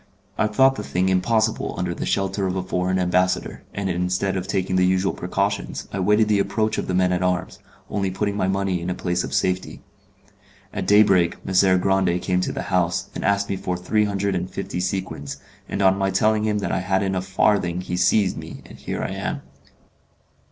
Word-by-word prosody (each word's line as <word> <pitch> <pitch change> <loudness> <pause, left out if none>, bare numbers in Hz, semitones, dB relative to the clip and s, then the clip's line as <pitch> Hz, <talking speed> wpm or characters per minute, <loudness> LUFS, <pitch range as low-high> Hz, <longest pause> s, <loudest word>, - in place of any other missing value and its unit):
I 110 - +1
thought 135 +4 +3
the 105 - -4
thing 95 -1 0
impossible 110 +4 +1
under 90 -1 -1
the - - -4
shelter 95 0 0
of 90 - -2
a 95 - -1
foreign 90 0 -1
ambassador, 90 0 0
and 100 -1 -3
instead 90 +2 0
of 95 0 -3
taking 95 -1 -1
the 90 - +4
usual 95 +1 +2
precautions, - - -2
I 100 - -2
waited 105 +3 +3
the 105 -1 +2
approach 110 +2 0
of - - -3
the 90 - -1
men 90 0 +3
at 90 0 0
arms, 90 0 -1 0.3
only 100 -2 -1
putting 100 +2 -2
my 95 -2 0
money 95 -2 0
in 85 - -3
a 90 - -1
place 90 -1 -1
of - - -5
safety. 90 0 -1 0.9
At - - -3
daybreak 100 -4 +4
Messer 95 0 +4
Grande 95 -1 +2
came 90 0 0
to - - -1
the - - -4
house, 90 -1 0
and - - -5
asked 100 0 +2
me 100 - -2
for 90 -2 -3
three 105 +4 +1
hundred 100 -1 -1
and 90 0 -2
fifty - - -4
sequins, 90 -7 -3 0.3
and 100 - -1
on 95 0 +4
my 95 0 +1
telling 110 +3 +2
him 105 -1 +1
that 95 - -2
I 95 - 0
hadn't 95 +1 0
a 95 - 0
farthing 95 -1 +1
he 90 - -4
seized 95 +2 +2
me, - - -9
and - - -13
here - - -4
I - - -3
am." - - -4
95 Hz, 210 wpm, -23 LUFS, 90-100 Hz, 0.9 s, the